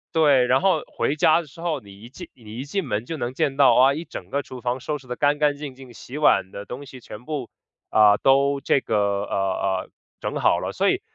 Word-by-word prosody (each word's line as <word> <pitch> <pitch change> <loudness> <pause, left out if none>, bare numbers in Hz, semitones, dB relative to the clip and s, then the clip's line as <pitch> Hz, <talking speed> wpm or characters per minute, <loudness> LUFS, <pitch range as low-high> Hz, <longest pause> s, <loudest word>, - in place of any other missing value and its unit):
对， 145 -6 +5
然 130 +2 +3
后 185 -5 +2
回 145 - -2
家 155 +2 +4
的 165 - -13
时 140 - -17
候， 165 -5 -2
你 100 -2 -15
一 115 - -11
进 175 +7 -11
你 110 -2 -11
一 130 - -4
进 160 +3 -3
门 105 -2 -2
就 165 +4 -5
能 120 -2 -3
见 135 +1 -1
到， 140 -2 +6
啊， 130 +2 +5
一 160 +4 -5
整 95 - -9
个 140 - -1
厨 130 -2 -10
房 125 +2 -2
收 150 +4 -3
拾 135 -2 -18
得 125 - -5
干 145 0 +2
干 145 -1 +1
净 145 -3 -7
净， 130 -2 -13
洗 125 +4 -9
碗 150 -10 +3
的 100 - -7
东 125 +7 -8
西 130 -2 -12
全 115 +1 -11
部， 150 -6 -4 0.4
呃， 105 -1 +5
都 140 +1 +3
这 140 - +2
个， 115 - -3 0.3
呃， - - -13
呃， 95 -1 -1 0.3
整 - - -3
好 - - +3
了。 - - -3
所 - - +1
以， - - 0
135 Hz, 270 characters per minute, -23 LUFS, 120-150 Hz, 0.4 s, 到